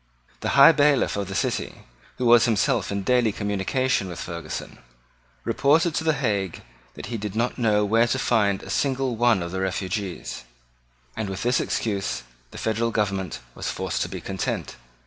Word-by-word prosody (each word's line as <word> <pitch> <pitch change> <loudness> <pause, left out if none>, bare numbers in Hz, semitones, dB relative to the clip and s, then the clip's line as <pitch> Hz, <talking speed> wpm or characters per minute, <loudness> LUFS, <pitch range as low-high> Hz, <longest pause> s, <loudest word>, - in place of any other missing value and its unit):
The - - -1
High 140 +4 +10
Bailiff 145 -4 +3
of 100 -1 -2
the 95 - -6
city, - - -2 0.3
who 125 - -2
was 120 -1 +7
himself 115 -1 +1
in 100 0 -2
daily 120 +1 +3
communication 100 +3 0
with 85 -2 -7
Ferguson, 85 -3 -6 0.6
reported 160 +4 +2
to 160 - -1
the 160 -1 +3
Hague 100 - -2 0.3
that - - -7
he - - -1
did 105 0 -5
not 120 +3 -1
know 105 -3 +3
where 115 +3 +3
to 130 - 0
find 105 -6 +1
a 95 - -7
single 135 +1 0
one 115 -5 +3
of 85 - -5
the 95 0 -3
refugees; 95 - -3 0.7
and 110 -3 -3
with 95 -1 -4
this 125 +1 +2
excuse 95 - -2 0.3
the - - -11
federal 110 +1 0
government 100 - -2
was - - -4
forced - - -2
to - - -1
be - - -5
content. 95 -2 -3
110 Hz, 175 wpm, -24 LUFS, 95-125 Hz, 0.7 s, High